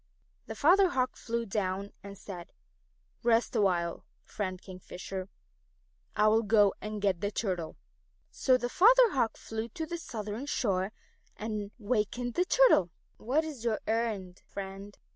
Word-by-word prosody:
The - - -6
Father 370 +5 +5
Hawk 255 -6 0
flew 235 0 -3
down 195 -1 -2
and 200 0 -10
said, 180 -3 -9 0.7
"Rest 235 +1 +2
awhile, 175 -5 +1 0.2
Friend 185 -3 -4
Kingfisher; 185 0 -7 0.9
I 210 0 +4
will 220 +1 +4
go 210 -2 +4
and 210 -1 -5
get 190 -4 +1
the 200 - 0
Turtle." 185 -6 -3 0.5
So 255 -1 +3
the 245 - -2
Father 470 - +6
Hawk 235 -7 0
flew 220 +1 -5
to 320 +7 -5
the 340 +2 -5
southern 220 -1 -5
shore 195 -7 0 0.5
and 210 -2 -4
wakened 240 +2 -1
the 360 - +2
Turtle. 455 - +5 0.3
"What 270 +8 +1
is 295 -7 -7
your 225 -3 0
errand, 215 -5 -2
Friend?" 195 +1 -7
215 Hz, 145 wpm, -30 LUFS, 195-245 Hz, 0.9 s, Father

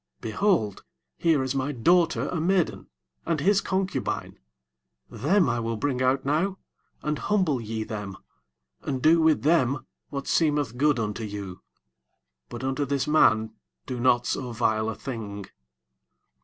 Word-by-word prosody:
24 110 - -3
Behold, 170 - +1 0.4
here 160 -5 +3
is 130 0 -2
my 135 +1 -1
daughter 170 +7 +2
a 165 - -2
maiden, 180 0 0 0.4
and 165 -2 -1
his 200 +6 +3
concubine; 190 0 -2 0.7
them 185 +6 +2
I 120 -1 0
will 115 -1 -2
bring 130 +1 -1
out 130 +1 +1
now, 170 +7 0 0.5
and 150 -1 -1
humble 185 - +1
ye 110 0 -3
them, 105 -3 -6 0.6
and 135 -2 -3
do 160 +5 +5
with 160 -1 +3
them 140 -4 +2 0.2
what 140 -1 -5
seemeth 145 -7 +1
good 145 +2 +2
unto 110 0 -3
you: 100 -3 -6 0.9
but 120 +2 -7
unto 135 +2 -1
this 140 -1 -1
man 110 -7 +4 0.3
do 125 - -4
not 120 0 +3
so 125 -2 -2
vile 110 -1 0
a 110 - -4
thing. 105 -6 -6
135 Hz, 145 wpm, -26 LUFS, 115-160 Hz, 0.9 s, do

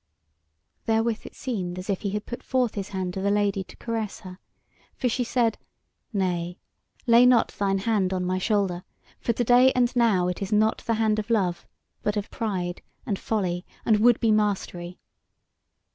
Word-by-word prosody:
Therewith 225 0 0
it - - -13
seemed 185 -9 -4
as 185 - -6
if 195 -3 -1
he 200 - -2
had 210 +1 -3
put 240 - -6
forth 255 -3 0
his 200 -2 -4
hand 185 -2 -3
to 190 - -4
the 200 - +1
Lady 200 -1 +1
to - - -14
caress 225 -3 -4
her, 185 -2 -10 0.6
for 255 - -1
she 245 +1 0
said: 235 -1 +1 0.5
"Nay, 180 -4 -1 0.5
lay 235 0 +6
not 250 -2 +5
thine 195 -1 0
hand 195 -2 +1
on 185 -1 -1
my 185 +1 0
shoulder, 190 -3 0 0.4
for 235 - 0
to 240 - 0
day 245 +2 +6
and 250 0 +1
now 215 -7 +3
it 180 +1 -3
is 195 - -3
not 215 +1 +3
the 230 - +2
hand 215 -1 +1
of 215 +1 -5
love, 190 -6 0 0.3
but 210 0 -1
of 205 - -4
pride 185 -5 -3 0.2
and 205 -6 -2
folly, 180 -5 -1 0.2
and 215 -2 +4
would 240 +1 +5
be 225 -2 +2
mastery. 190 -4 -1
210 Hz, 185 wpm, -25 LUFS, 185-230 Hz, 0.6 s, lay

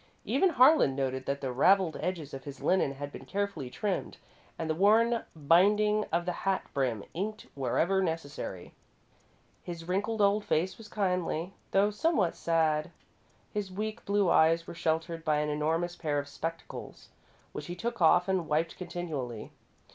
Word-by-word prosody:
Even 380 - +3
Harlan 265 - +5
noted 130 -1 -2
that 140 0 -2
the 135 -2 -2
ravelled 180 +5 +4
edges 165 -4 -3
of 135 -1 -7
his 140 0 -8
linen 180 -7 +2
had 145 +1 -6
been - - -9
carefully 200 -10 -3
trimmed 195 +8 -3 0.4
and 160 - -3
the 160 - +1
worn 225 +6 +3
binding 205 +7 +4
of 170 +1 0
the 180 - 0
hat 195 -1 0
brim 125 -7 0
inked 205 +5 -4
wherever 170 +8 +1
necessary. 155 - -4 0.9
His 170 -1 -7
wrinkled 205 +4 -1
old 205 +1 +3
face 180 +4 0
was 225 - -11
kindly, 180 -3 -1 0.2
though 200 +2 +3
somewhat 210 - +1
sad. 160 -1 +1 0.6
His 205 -2 -3
weak 215 +4 -4
blue 200 -1 +2
eyes 165 0 +4
were - - -8
sheltered 165 0 -1
by 155 -1 +2
an 150 0 0
enormous 160 +4 -1
pair 150 -4 -1
of 145 0 -2
spectacles, 165 +3 -7 0.4
which - - -7
he 175 - -5
took 235 +2 -4
off 175 +2 +5
and 185 -4 0
wiped 160 +2 0
continually. 155 - -5
170 Hz, 160 wpm, -30 LUFS, 150-200 Hz, 0.9 s, Harlan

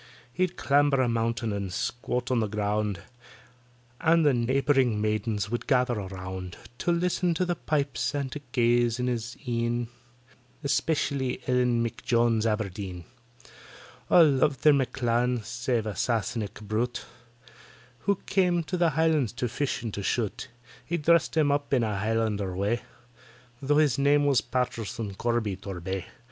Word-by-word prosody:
He'd 180 +2 -1
clamber 145 -1 +3
a 130 - +3
mountain 115 -1 -1
and 100 -2 -3
squat 125 +5 -2
on 125 - +3
the 110 - 0
ground, 105 -1 -1 1.0
And 165 0 +4
the 145 - +5
neighbouring 130 -1 +2
maidens 105 -1 -1
would 120 - -3
gather 125 -2 +3
around 95 -2 -6 0.2
To 175 - +1
list 175 +2 0
to 185 - +1
the 175 -1 -1
pipes 140 -5 -1
and 140 -2 -2
to 150 - -5
gaze 120 -1 +2
in 125 - 0
his 120 -1 -3
een, 120 0 -1 0.7
Especially 140 -2 0
ELLEN 125 -2 +2
M'JONES 115 -1 +1
ABERDEEN. 100 -5 -3 1.0
All 170 - +8
loved 140 0 +1
their 150 - +7
M'CLAN, 125 -3 0
save 120 0 -2
a 105 -2 -4
Sassenach 110 -1 -2
brute, 115 +4 -2 0.9
Who 200 - +1
came 180 -3 +2
to 180 +3 -3
the 170 -1 +3
Highlands 160 -7 +2
to 125 +1 -2
fish 135 +3 -2
and 110 -3 -4
to 100 - -4
shoot; 110 +3 -2 0.4
He 170 - -2
dressed 170 +2 +3
himself 145 -2 +3
up - - -5
in 125 - +2
a 105 -3 -1
Highlander 105 -3 -1
way, 105 +5 0 0.8
Tho' 145 +2 +2
his 145 -5 +3
name 145 +1 +4
it - - +2
was 130 -6 +3
PATTISON 115 -4 -3
CORBY 110 -2 -1
TORBAY. 95 -1 -5
120 Hz, 150 wpm, -27 LUFS, 110-140 Hz, 1.0 s, All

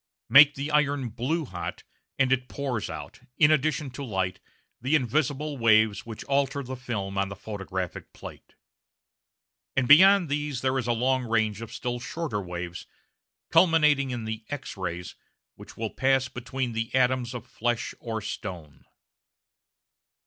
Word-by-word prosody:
Make 145 +1 +8
the 140 +3 -4
iron 145 -4 +1
"blue 135 +9 -2
hot," 90 -8 -6 0.3
and 135 -1 +3
it 125 -1 -1
pours 130 -6 -3
out, - - -8 0.2
in 150 -1 +6
addition 155 -1 +1
to 140 +3 -7
light, 95 -7 -2 0.4
the 135 +5 +2
invisible 145 +2 0
waves 110 -2 +3
which 110 -2 -7
alter 140 0 0
the 130 +1 -6
film 100 -6 -4
on 100 0 0
the 100 - -7
photographic 95 -3 -5
plate. - - -12 1.2
And 135 -2 +2
beyond 190 +5 +7
these 145 -3 -2
there 130 0 +1
is 120 - -4
a - - +2
long 130 +2 +1
range 110 -2 0
of 115 -1 -7
still 125 -2 -3
shorter 125 -5 -3
waves, 90 -1 -6 0.6
culminating 150 -6 +4
in 120 -3 -4
the 110 0 -5
X 145 -1 -5
rays, 90 -2 -5 0.4
which - - -14
will 110 -1 -3
pass 135 -1 +2
between 125 0 -4
the 115 +1 -2
atoms 125 -1 +1
of 120 - -6
flesh 120 -1 -2
or 115 -2 -4
stone. 90 -6 -7
125 Hz, 150 wpm, -27 LUFS, 110-140 Hz, 1.2 s, Make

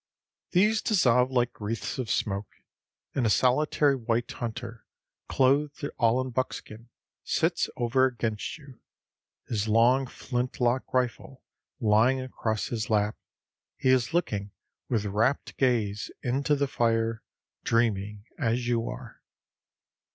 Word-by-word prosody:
These 210 +4 +3
dissolve 125 - +3
like 120 -3 -1
wreaths 110 +5 -3
of 125 -4 -3
smoke, 100 -3 -1 0.6
and 125 -4 +1
a - - +2
solitary 140 +4 +3
white 120 -1 -1
hunter, 120 -1 -6 0.5
clothed 140 +2 +2
all 115 +1 +3
in 130 0 -4
buckskin, 115 -2 -4 0.3
sits - - 0
over 125 +2 +3
against 115 +1 -3
you. 140 -6 -15 0.7
His 110 -1 -1
long 120 +5 +4
flint 125 0 -4
lock 125 +1 +1
rifle 130 +1 -2 0.4
lying 115 +4 +3
across 115 -4 -3
his 110 -2 -3
lap, 105 -1 +1 0.6
he 130 - +1
is 130 0 +3
looking 105 - -1 0.4
with 110 -4 0
rapt 110 +7 0
gaze 110 -6 +1
into 135 +4 +1
the 140 0 +1
fire, 115 -3 0 0.4
dreaming 105 -3 0
as 120 -2 0
you 120 -1 0
are. 125 -2 -9
120 Hz, 120 wpm, -27 LUFS, 110-130 Hz, 0.7 s, long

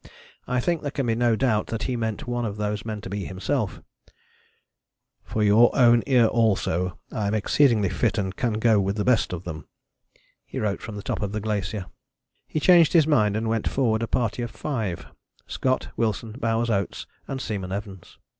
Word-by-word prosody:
I 125 - 0
think 170 +5 0
there 145 - -3
can 140 -2 -2
be 115 - +1
no 120 0 +2
doubt 110 -3 +1
that 115 -1 -3
he 130 - -1
meant 110 -3 -3
one 120 0 -2
of 105 -2 -3
those 105 0 -2
men 110 -2 -5
to - - -7
be 100 -1 -3
himself: 95 0 -2 1.4
"for 110 - -2
your 110 +3 +6
own 120 -2 +6
ear 125 -4 +5
also, 100 -6 +1
I 105 -2 -2
am 105 - 0
exceedingly 110 -1 +3
fit 115 +4 0
and 95 -2 -2
can 120 -3 -1
go 110 0 +3
with 100 +1 -1
the 105 - -1
best 125 -4 +2
of 90 -1 -5
them," 80 -5 -7 0.8
he - - -9
wrote 105 -2 -1
from 110 - -7
the 100 - -7
top - - -3
of 100 -1 -3
the 105 - -1
glacier. 100 -2 -3 0.6
He 155 - -2
changed 170 0 +6
his 165 -4 +6
mind 110 -9 +2
and 110 +1 -2
went 115 -1 0
forward 115 -5 +1
a 115 - -1
party 120 0 -1
of 120 - -3
five: 110 - -4 0.4
Scott, 130 0 -1
Wilson, 110 0 -1
Bowers, 115 0 -1
Oates 100 -3 -2 0.2
and 135 - -4
Seaman 100 -7 -4
Evans. 100 -2 -7
110 Hz, 195 wpm, -25 LUFS, 100-120 Hz, 1.4 s, your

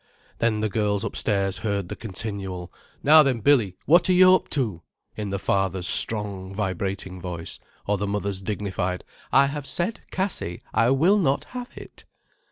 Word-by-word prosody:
Then 110 -2 +1
the 110 - +1
girls 105 -1 0
upstairs 100 -3 0
heard 100 -4 -2
the - - -6
continual: 95 -4 -5 0.3
"Now 155 +2 +8
then, 135 -5 +1
Billy, 110 -7 +3
what 170 +3 +4
are - - +5
you 185 0 +7
up 185 - +1
to?" 110 - -2 0.3
in 105 -2 -4
the 100 - -2
father's 95 -2 -1
strong, 100 -3 +2
vibrating 95 -2 -3
voice: 85 -2 -6 0.3
or 105 -1 0
the 100 - -2
mother's 100 -1 -2
dignified: 95 -3 -3 0.3
"I 135 - +6
have 140 0 -4
said, 180 +6 -2
Cassie, 185 - -2
I 115 - +3
will 170 +11 +4
not 140 -6 +1
have 250 -1 -6
it." - - -12
105 Hz, 165 wpm, -24 LUFS, 95-135 Hz, 0.3 s, Now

